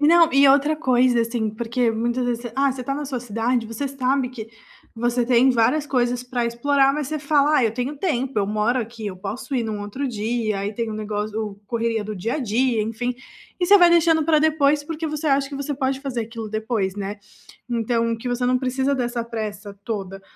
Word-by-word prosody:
Não, 330 Hz, +2 st, +6 dB
e 275 Hz, +1 st, +6 dB
outra 290 Hz, +3 st, +4 dB
coisa 250 Hz, -4 st, +3 dB
assim. 230 Hz, -1 st, -1 dB
Porque 235 Hz, +2 st, 0 dB
muitas 240 Hz, +3 st, -1 dB
vezes 240 Hz, -1 st, -2 dB
você, 240 Hz, -, -7 dB
ah, 275 Hz, 0 st, +3 dB
você 255 Hz, -, -6 dB
tá 275 Hz, -, -2 dB
na 290 Hz, +1 st, -4 dB
sua 260 Hz, -3 st, -4 dB
cidade, 230 Hz, +1 st, -1 dB
você 230 Hz, +5 st, -4 dB
sabe 265 Hz, -1 st, 0 dB
que 225 Hz, -3 st, -8 dB, 0.5 s
você 240 Hz, +1 st, +1 dB
tem 250 Hz, +1 st, +5 dB
várias 250 Hz, +5 st, +2 dB
coisas 245 Hz, -2 st, 0 dB
pra 250 Hz, -1 st, -2 dB
explorar, 275 Hz, +3 st, +2 dB
mas 295 Hz, -2 st, -3 dB
você 310 Hz, 0 st, -2 dB
fala: 295 Hz, +1 st, +3 dB
"Ah, 245 Hz, -, +3 dB
eu 220 Hz, -, +1 dB
tenho 260 Hz, +4 st, -3 dB
tempo, 270 Hz, -, -1 dB
eu 200 Hz, -, +1 dB
moro 215 Hz, +4 st, +1 dB
aqui, 225 Hz, -1 st, -7 dB
eu 185 Hz, -2 st, -5 dB
posso 210 Hz, +8 st, -5 dB
ir 245 Hz, -, +1 dB
num 215 Hz, -2 st, -3 dB
outro 230 Hz, +8 st, -4 dB
dia", 220 Hz, -2 st, -2 dB
aí 205 Hz, +2 st, -3 dB
tem 230 Hz, +1 st, -3 dB
o -, -, -4 dB
negócio 210 Hz, 0 st, -3 dB
o 210 Hz, -2 st, -4 dB
correria 230 Hz, -2 st, -1 dB
do 215 Hz, 0 st, -5 dB
dia 210 Hz, +5 st, -2 dB
a -, -, -1 dB
dia, 240 Hz, -1 st, +1 dB
enfim. 235 Hz, +3 st, -3 dB, 0.5 s
E -, -, +3 dB
você 405 Hz, +1 st, +8 dB
vai 350 Hz, -, +7 dB
deixando 325 Hz, -2 st, +4 dB
pra 320 Hz, -2 st, +4 dB
depois, 300 Hz, -2 st, +2 dB
porque 320 Hz, +1 st, -4 dB
você 305 Hz, +1 st, -3 dB
acha 275 Hz, 0 st, +2 dB
que 280 Hz, -, -6 dB
você 280 Hz, +1 st, -3 dB
pode 265 Hz, 0 st, -1 dB
fazer 265 Hz, -4 st, -3 dB
aquilo 225 Hz, -1 st, -7 dB
depois, 215 Hz, -3 st, -2 dB
né. 200 Hz, +1 st, -4 dB, 0.5 s
Então, 230 Hz, -1 st, 0 dB
que 245 Hz, +2 st, -6 dB
você 245 Hz, 0 st, 0 dB
não 255 Hz, 0 st, +3 dB
precisa 265 Hz, +2 st, 0 dB
dessa 240 Hz, -2 st, -2 dB
pressa 210 Hz, -3 st, -6 dB
toda, 195 Hz, -3 st, -5 dB
245 Hz, 220 wpm, -22 LUFS, 225-275 Hz, 0.5 s, você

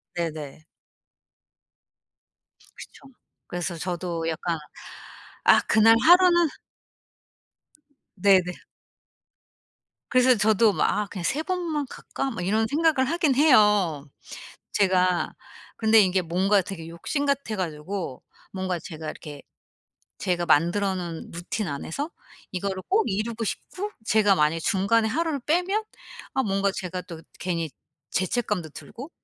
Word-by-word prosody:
네네. 155 Hz, -3 st, -5 dB, 2.1 s
그쵸. -, -, -13 dB, 0.4 s
그래서 175 Hz, 0 st, -4 dB
저도 175 Hz, -1 st, -3 dB
약간 165 Hz, +1 st, -2 dB, 0.9 s
'아 -, -, +7 dB
그날 225 Hz, +1 st, +6 dB
하루는' 350 Hz, -1 st, +6 dB, 1.7 s
네네. 185 Hz, -2 st, +4 dB, 1.6 s
그래서 255 Hz, 0 st, +5 dB
저도 215 Hz, 0 st, +3 dB
막 -, -, +1 dB
'아 210 Hz, 0 st, 0 dB
그냥 185 Hz, -3 st, -7 dB
3 300 Hz, -, 0 dB
번만 335 Hz, -6 st, -2 dB
갈까?' 270 Hz, +1 st, -5 dB
막 180 Hz, -6 st, -4 dB
이런 220 Hz, +3 st, +2 dB
생각을 300 Hz, -2 st, +2 dB
하긴 315 Hz, -6 st, +1 dB
해요 210 Hz, -, +4 dB, 0.6 s
제가. 185 Hz, -3 st, +2 dB, 0.5 s
근데 220 Hz, 0 st, +5 dB
이게 185 Hz, -2 st, +2 dB
뭔가 190 Hz, +4 st, +2 dB
되게 170 Hz, -4 st, -8 dB
욕심 280 Hz, -, -3 dB
같아 280 Hz, -6 st, -1 dB
가지고 165 Hz, -3 st, -4 dB, 0.3 s
뭔가 185 Hz, -2 st, -2 dB
제가 160 Hz, -1 st, -9 dB
이렇게 145 Hz, -2 st, -10 dB, 0.8 s
제가 175 Hz, -2 st, -1 dB
만들어 190 Hz, +6 st, +2 dB
놓은 170 Hz, -3 st, -6 dB
루틴 175 Hz, +4 st, -4 dB
안에서 165 Hz, -, -4 dB, 0.4 s
이거를 190 Hz, 0 st, -3 dB
꼭 415 Hz, +4 st, +3 dB
이루고 220 Hz, +3 st, -2 dB
싶고 400 Hz, -, -5 dB, 0.2 s
제가 205 Hz, -3 st, +4 dB
만약에 155 Hz, 0 st, +1 dB
중간에 200 Hz, +6 st, +2 dB
하루를 315 Hz, +1 st, -1 dB
빼면 360 Hz, -, 0 dB, 0.5 s
아 265 Hz, -, +2 dB
뭔가 195 Hz, -2 st, +1 dB
제가 180 Hz, -2 st, -4 dB
또 165 Hz, -2 st, -10 dB, 0.2 s
괜히 170 Hz, -3 st, -2 dB, 0.4 s
죄책감도 185 Hz, -3 st, -1 dB
들고 265 Hz, -, -10 dB
195 Hz, 235 characters per minute, -25 LUFS, 175-250 Hz, 2.1 s, 아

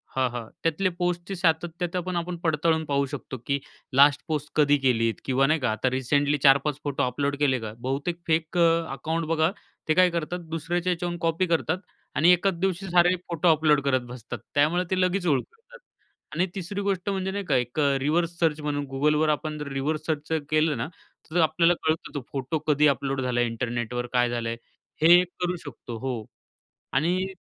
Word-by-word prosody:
हां, 130 Hz, -1 st, +2 dB
हां. 120 Hz, -2 st, -5 dB, 0.2 s
त्यातले 175 Hz, +4 st, +1 dB
पोस्टची 180 Hz, +2 st, -2 dB
सातत्यता 175 Hz, +1 st, 0 dB
पण 180 Hz, -, -2 dB
आपण 175 Hz, +1 st, -2 dB
पडताळून 160 Hz, 0 st, +1 dB
पाहू 140 Hz, -1 st, +1 dB
शकतो 130 Hz, -, -6 dB
की 140 Hz, 0 st, 0 dB, 0.3 s
लास्ट 145 Hz, +2 st, +6 dB
पोस्ट 150 Hz, -2 st, -2 dB
कधी 145 Hz, -1 st, +4 dB
केली 115 Hz, -4 st, +2 dB
किंवा 135 Hz, +1 st, +2 dB
नाही 155 Hz, +1 st, +2 dB
का 125 Hz, -4 st, 0 dB
आता 110 Hz, +4 st, 0 dB
रिसेंटली 145 Hz, +3 st, +1 dB
4-5 140 Hz, +1 st, +4 dB
फोटो 145 Hz, -2 st, -1 dB
अपलोड 140 Hz, +3 st, -1 dB
केले 135 Hz, -4 st, +2 dB
का? 110 Hz, -1 st, -6 dB
बहुतेक 140 Hz, +7 st, -2 dB
फेक 160 Hz, +2 st, 0 dB
अकाउंट 165 Hz, -1 st, +1 dB
बघा 160 Hz, +1 st, +2 dB, 0.4 s
ते 155 Hz, -, +4 dB
काय 185 Hz, +1 st, +5 dB
करतात 170 Hz, +1 st, -3 dB
दुसऱ्याच्या 170 Hz, +3 st, -1 dB
याच्यावून 175 Hz, 0 st, -3 dB
कॉपी 165 Hz, +2 st, +1 dB
करतात 165 Hz, +1 st, +1 dB, 0.4 s
आणि 170 Hz, +4 st, +5 dB
एकाच 190 Hz, +2 st, +2 dB
दिवशी 190 Hz, 0 st, -1 dB
सारे 175 Hz, +1 st, +4 dB
फोटो 170 Hz, +1 st, 0 dB
अपलोड 150 Hz, -2 st, +3 dB
करत 130 Hz, -2 st, +2 dB
बसतात. 125 Hz, -2 st, -7 dB, 0.2 s
त्यामुळे 160 Hz, +5 st, +3 dB
ते 185 Hz, -, +1 dB
लगेच 185 Hz, 0 st, +1 dB
ओळखू 145 Hz, -, 0 dB
येतात -, -, -16 dB, 0.6 s
आणि 180 Hz, +3 st, +2 dB
तिसरी 195 Hz, +2 st, -4 dB
गोष्ट 195 Hz, 0 st, -1 dB
म्हणजे 190 Hz, -1 st, -1 dB
नाही 200 Hz, 0 st, -3 dB
का 140 Hz, -, +1 dB
एक 125 Hz, +4 st, -1 dB, 0.2 s
रिव्हर्स 170 Hz, +4 st, 0 dB
सर्च 160 Hz, -2 st, +2 dB
म्हणून 145 Hz, -1 st, -2 dB
Googleवर 150 Hz, +3 st, +2 dB
आपण 150 Hz, 0 st, -1 dB
रिव्हर्स 145 Hz, +3 st, -2 dB
सर्च 155 Hz, -1 st, -2 dB
जर 160 Hz, -1 st, +1 dB
केलं 155 Hz, -3 st, +2 dB
ना 115 Hz, -, -2 dB, 0.4 s
तर 175 Hz, -, +1 dB
आपल्याला 170 Hz, +2 st, +4 dB
कळतं 160 Hz, +1 st, -1 dB
तो 140 Hz, -, -2 dB
फोटो 140 Hz, +3 st, -2 dB
कधी 150 Hz, 0 st, +4 dB
अपलोड 135 Hz, 0 st, 0 dB
झालाय 120 Hz, -1 st, +1 dB
इंटरनेटवर, 120 Hz, +1 st, -3 dB
काय 120 Hz, -1 st, +3 dB
झालंय? 115 Hz, -1 st, -2 dB, 0.5 s
हे 175 Hz, +3 st, +7 dB
करू 180 Hz, 0 st, -3 dB
शकतो. 120 Hz, -4 st, -8 dB
हो. 120 Hz, -4 st, -4 dB, 0.7 s
आणि 180 Hz, +6 st, +1 dB
155 Hz, 180 wpm, -26 LUFS, 135-175 Hz, 0.7 s, हे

